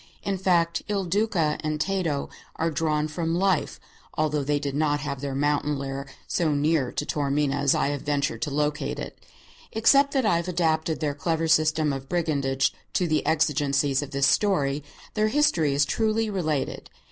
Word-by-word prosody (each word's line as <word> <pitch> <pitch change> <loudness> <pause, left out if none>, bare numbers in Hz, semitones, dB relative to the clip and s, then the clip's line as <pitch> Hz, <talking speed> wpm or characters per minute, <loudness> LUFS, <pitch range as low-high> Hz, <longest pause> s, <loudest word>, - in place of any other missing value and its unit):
In 195 -2 -2
fact, 170 -3 +2
Il 200 -2 -1
Duca 175 -5 0
and 155 0 -2
Tato 170 -5 -1 0.3
are 165 +1 -1
drawn 155 0 0
from 165 +1 -2
life, 190 -3 +1 0.4
although 150 -2 0
they 145 +1 +1
did 140 -1 -3
not 145 0 +1
have 140 -2 -4
their 140 -2 -3
mountain 145 +1 0
lair 135 0 -5 0.2
so 155 -4 0
near 145 -3 +1
to - - -3
Taormina 145 -1 0
as 140 -1 +2
I - - +1
have 145 -1 -3
ventured 145 +1 -1
to 155 - -1
locate 150 +1 -1
it. - - -7 0.5
Except 275 +6 +4
that 265 -3 +2
I 190 -6 +3
have 170 +1 -3
adapted 160 -2 0
their 150 -2 0
clever 160 +2 -1
system 155 -1 +3
of 135 0 -7
brigandage 140 -6 0 0.2
to 180 - +1
the 155 -1 +1
exigencies 145 -3 +2
of 145 - -6
this 140 0 +1
story, 145 -9 +2 0.3
their 215 0 +2
history 175 - +2
is 145 0 +3
truly 220 +4 0
related. 155 -7 -2
155 Hz, 175 wpm, -25 LUFS, 145-170 Hz, 0.5 s, Except